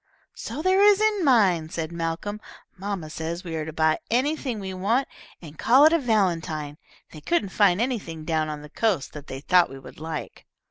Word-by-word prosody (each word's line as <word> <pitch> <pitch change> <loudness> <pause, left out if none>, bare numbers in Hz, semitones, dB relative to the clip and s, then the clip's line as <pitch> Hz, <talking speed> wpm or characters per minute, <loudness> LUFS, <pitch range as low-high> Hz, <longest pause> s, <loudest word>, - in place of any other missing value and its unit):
"So 305 - -6
there 375 +1 +4
is 410 -1 +6
in 430 -3 +2
mine," 195 - +3
said 165 -2 -4
Malcolm. 170 +5 -4 0.3
"Mamma 195 -4 -4
says 165 +3 -5
we 165 -3 -5
are 155 -1 -3
to 160 - -6
buy 160 0 +1
anything 255 -1 0
we 190 -1 -5
want, 220 +9 0 0.4
and 155 -2 -12
call 260 +5 +6
it 315 - +6
a 335 - +4
valentine. 165 - -1 0.3
They 155 - -11
couldn't 225 - 0
find 195 -2 +3
anything 200 -11 -3
down 155 -2 0
on 150 -1 -6
the 150 - -11
coast 200 - 0
that 150 -1 -10
they 135 0 -7
thought 180 +3 +4
we 135 - -9
would 135 - -13
like." 160 -1 -7
180 Hz, 195 wpm, -25 LUFS, 160-235 Hz, 0.4 s, is